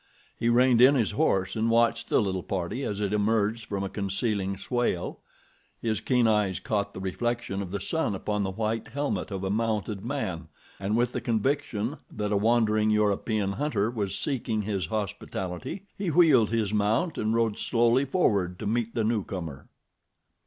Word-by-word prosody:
He 115 Hz, -, 0 dB
reined 120 Hz, 0 st, +5 dB
in 135 Hz, +3 st, +8 dB
his 115 Hz, -6 st, +1 dB
horse 95 Hz, -2 st, +1 dB
and 110 Hz, +1 st, +1 dB
watched 115 Hz, 0 st, +2 dB
the -, -, +4 dB
little 95 Hz, -2 st, -1 dB
party 95 Hz, +8 st, -3 dB
as 105 Hz, -4 st, -3 dB
it 100 Hz, 0 st, 0 dB
emerged 110 Hz, +1 st, +1 dB
from 100 Hz, -2 st, -2 dB
a -, -, -1 dB
concealing 100 Hz, 0 st, -2 dB
swale. 120 Hz, -4 st, -1 dB, 0.6 s
His 110 Hz, -3 st, -1 dB
keen 125 Hz, -2 st, +2 dB
eyes 105 Hz, -5 st, +2 dB
caught 100 Hz, -2 st, -2 dB
the -, -, -5 dB
reflection 100 Hz, +2 st, -2 dB
of 95 Hz, -, -5 dB
the 100 Hz, +2 st, -3 dB
sun 110 Hz, +1 st, -1 dB
upon 105 Hz, +2 st, -2 dB
the 95 Hz, -, -1 dB
white 110 Hz, +3 st, -2 dB
helmet 140 Hz, +5 st, -2 dB
of 95 Hz, -2 st, -4 dB
a 95 Hz, -, -1 dB
mounted 105 Hz, -2 st, -1 dB
man, 95 Hz, -, -3 dB, 0.3 s
and 100 Hz, +3 st, 0 dB
with 120 Hz, 0 st, +2 dB
the 125 Hz, -, -3 dB
conviction 120 Hz, +1 st, -1 dB
that 105 Hz, -1 st, -3 dB
a -, -, +2 dB
wandering 110 Hz, 0 st, +3 dB
European 105 Hz, -1 st, +1 dB
hunter 110 Hz, -2 st, 0 dB
was 100 Hz, -4 st, -2 dB
seeking 115 Hz, -6 st, -1 dB
his 100 Hz, -5 st, -2 dB
hospitality, 95 Hz, -, -4 dB
he 195 Hz, -3 st, -2 dB
wheeled 150 Hz, -9 st, +5 dB
his 110 Hz, -2 st, 0 dB
mount 110 Hz, -, +1 dB
and 110 Hz, +1 st, +1 dB
rode 115 Hz, -2 st, +1 dB
slowly 120 Hz, +3 st, +3 dB
forward 100 Hz, -, +1 dB
to 105 Hz, -, -6 dB
meet 115 Hz, +2 st, -1 dB
the 115 Hz, -, +1 dB
newcomer. 95 Hz, -, -3 dB
110 Hz, 175 wpm, -27 LUFS, 100-120 Hz, 0.6 s, in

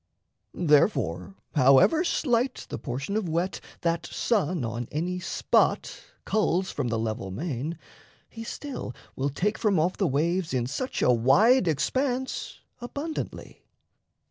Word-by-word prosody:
Therefore, 100 Hz, -, +2 dB, 0.2 s
however 135 Hz, -, +5 dB
slight 250 Hz, -6 st, 0 dB
The -, -, -5 dB
portion 140 Hz, +11 st, -4 dB
of 210 Hz, -6 st, -1 dB
wet 170 Hz, +4 st, -1 dB, 0.2 s
that 170 Hz, 0 st, 0 dB
sun 180 Hz, -, 0 dB
on 115 Hz, +1 st, -4 dB
any 180 Hz, +4 st, -2 dB
spot 185 Hz, -, +1 dB, 0.2 s
Culls 190 Hz, -3 st, +1 dB
from -, -, -2 dB
the 115 Hz, -1 st, 0 dB
level 110 Hz, -2 st, -3 dB
main, 150 Hz, -, -4 dB, 0.5 s
he 225 Hz, -, -9 dB
still 250 Hz, -, -6 dB, 0.2 s
will 135 Hz, +2 st, -1 dB
take 200 Hz, +10 st, -1 dB
From 200 Hz, -6 st, +2 dB
off 175 Hz, +4 st, +1 dB
the 195 Hz, -, +2 dB
waves 165 Hz, +3 st, 0 dB
in 120 Hz, -2 st, +1 dB
such 255 Hz, -, -3 dB
a -, -, +5 dB
wide 180 Hz, -, +5 dB
expanse 260 Hz, -, -1 dB, 0.2 s
Abundantly. 285 Hz, +6 st, -6 dB
170 Hz, 130 wpm, -27 LUFS, 130-220 Hz, 0.5 s, however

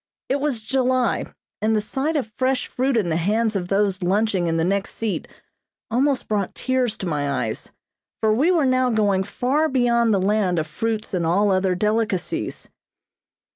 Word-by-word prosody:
It 275 Hz, -, +1 dB
was 275 Hz, -6 st, -2 dB
July, 255 Hz, 0 st, +1 dB, 0.3 s
and 220 Hz, +1 st, +2 dB
the -, -, +3 dB
sight 270 Hz, +9 st, -2 dB
of 225 Hz, -7 st, -2 dB
fresh 260 Hz, 0 st, 0 dB
fruit 260 Hz, 0 st, 0 dB
in 195 Hz, -6 st, +1 dB
the 160 Hz, -, +1 dB
hands 215 Hz, +5 st, +1 dB
of 180 Hz, -2 st, -2 dB
those 195 Hz, -1 st, +1 dB
lunching 190 Hz, 0 st, +1 dB
in 165 Hz, 0 st, 0 dB
the 165 Hz, -, +1 dB
next 195 Hz, +3 st, -1 dB
seat 225 Hz, -3 st, -3 dB, 0.6 s
almost 265 Hz, +2 st, +1 dB
brought 205 Hz, -3 st, -1 dB
tears 255 Hz, -4 st, 0 dB
to 190 Hz, -, -5 dB
my 145 Hz, -4 st, -1 dB
eyes, 110 Hz, -1 st, -5 dB, 0.5 s
for 220 Hz, -1 st, +2 dB
we 280 Hz, +10 st, +3 dB
were 335 Hz, -6 st, +3 dB
now 255 Hz, -1 st, +2 dB
going 205 Hz, -4 st, +2 dB
far 270 Hz, +10 st, 0 dB
beyond 235 Hz, -3 st, +2 dB
the 200 Hz, -, +3 dB
land 195 Hz, -2 st, +1 dB
of 155 Hz, -, 0 dB
fruits 215 Hz, +8 st, -3 dB
and 180 Hz, -2 st, 0 dB
all 195 Hz, +5 st, +2 dB
other 185 Hz, -1 st, +1 dB
delicacies. 210 Hz, -1 st, -1 dB
215 Hz, 175 wpm, -22 LUFS, 190-255 Hz, 0.6 s, the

